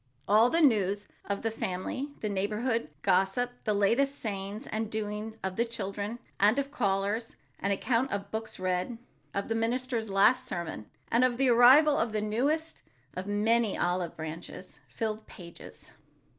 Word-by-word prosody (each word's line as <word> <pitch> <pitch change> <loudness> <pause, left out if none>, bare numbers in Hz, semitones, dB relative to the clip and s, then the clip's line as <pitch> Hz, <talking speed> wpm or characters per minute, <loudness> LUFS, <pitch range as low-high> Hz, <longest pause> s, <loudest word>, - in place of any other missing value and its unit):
All 220 +4 +5
the 335 +4 +2
news 205 - +3 0.2
of 200 0 -3
the 225 - 0
family, 220 +7 -3
the 215 - -1
neighborhood 210 +1 -1
gossip, 195 +7 +2
the 215 - +2
latest 260 +8 +2
sayings 200 0 -4
and 220 0 -3
doings 215 0 -4
of 190 -1 -3
the 235 - +3
children 210 -1 -4 0.2
and 210 +5 +4
of 280 0 -1
callers, 205 -2 -1 0.2
an 200 - -1
account 230 +6 +1
of 200 - -1
the - - -26
books 220 0 -5
read, 185 +5 -1 0.4
of 200 - -1
the 225 - 0
minister's 230 0 -1
last 225 +6 +4
sermon 170 - -5 0.2
and 235 +2 +4
of 250 -1 +2
the 265 0 +3
arrival 265 +5 +7
of 225 -1 0
the 215 - +1
newest 285 +10 0 0.4
of 185 +2 -5
many 215 +1 +2
olive 175 -1 -1
branches, 165 +3 -8
filled 220 -1 -4
pages. 170 -2 -12
215 Hz, 160 wpm, -29 LUFS, 195-240 Hz, 0.4 s, arrival